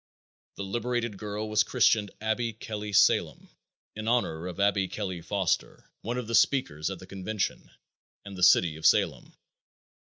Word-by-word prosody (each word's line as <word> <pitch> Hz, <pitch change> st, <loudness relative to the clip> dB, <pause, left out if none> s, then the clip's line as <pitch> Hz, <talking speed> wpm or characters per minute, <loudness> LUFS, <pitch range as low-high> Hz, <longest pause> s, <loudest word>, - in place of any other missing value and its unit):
The 100 Hz, -, -5 dB
liberated 120 Hz, +1 st, -2 dB
girl 105 Hz, +1 st, -4 dB
was 110 Hz, 0 st, +2 dB
christened 110 Hz, -1 st, +2 dB
Abby 110 Hz, +2 st, -1 dB
Kelly 105 Hz, -1 st, -6 dB
Salem, 100 Hz, -, +2 dB, 0.5 s
in 110 Hz, +1 st, -6 dB
honor 90 Hz, -9 st, 0 dB
of 90 Hz, +1 st, -7 dB
Abby 100 Hz, -1 st, +2 dB
Kelly 95 Hz, -3 st, -5 dB
Foster, 95 Hz, -1 st, -2 dB
one 120 Hz, +3 st, -3 dB
of 125 Hz, -, -3 dB
the 115 Hz, -, -6 dB
speakers 95 Hz, -, +2 dB
at 95 Hz, -, -5 dB
the 95 Hz, -, -12 dB
convention, 95 Hz, +2 st, -4 dB, 0.6 s
and 100 Hz, -1 st, -8 dB
the 90 Hz, -, -7 dB
city 85 Hz, -3 st, +5 dB
of 80 Hz, -, -8 dB
Salem. -, -, +1 dB
105 Hz, 155 wpm, -28 LUFS, 95-110 Hz, 0.6 s, city